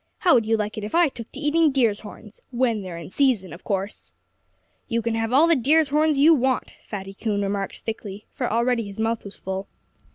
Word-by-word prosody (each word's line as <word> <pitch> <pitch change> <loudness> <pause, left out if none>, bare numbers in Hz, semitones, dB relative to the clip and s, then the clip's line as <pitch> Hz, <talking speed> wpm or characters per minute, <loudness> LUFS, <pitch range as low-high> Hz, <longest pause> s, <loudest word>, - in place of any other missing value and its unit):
How 360 - +4
would 230 -4 +3
you 225 0 +3
like 215 +1 -3
it - - -7
if 210 - -4
I 340 -2 +5
took 230 -4 -10
to - - -9
eating 305 +1 +3
deer's 235 -6 +2
horns 210 0 -12
when 235 -4 0
they're 180 -3 -7
in 170 +1 -9
season, 240 -10 +1
of 170 - -12
course?" 195 0 -4 0.8
"You 230 - 0
can 230 0 -1
have 225 0 -1
all 280 +6 +6
the 335 0 +4
deer's 295 +4 +3
horns 305 +1 +2
you 305 +4 +7
want," 260 -3 0 0.2
Fatty 195 -2 -6
Coon 205 0 -2
remarked 195 0 -3
thickly 210 -2 -6
for - - -2
already 235 -1 +1
his 200 +1 -9
mouth 225 0 -1
was 200 - -10
full. 190 +1 -5
225 Hz, 220 wpm, -24 LUFS, 205-270 Hz, 0.8 s, you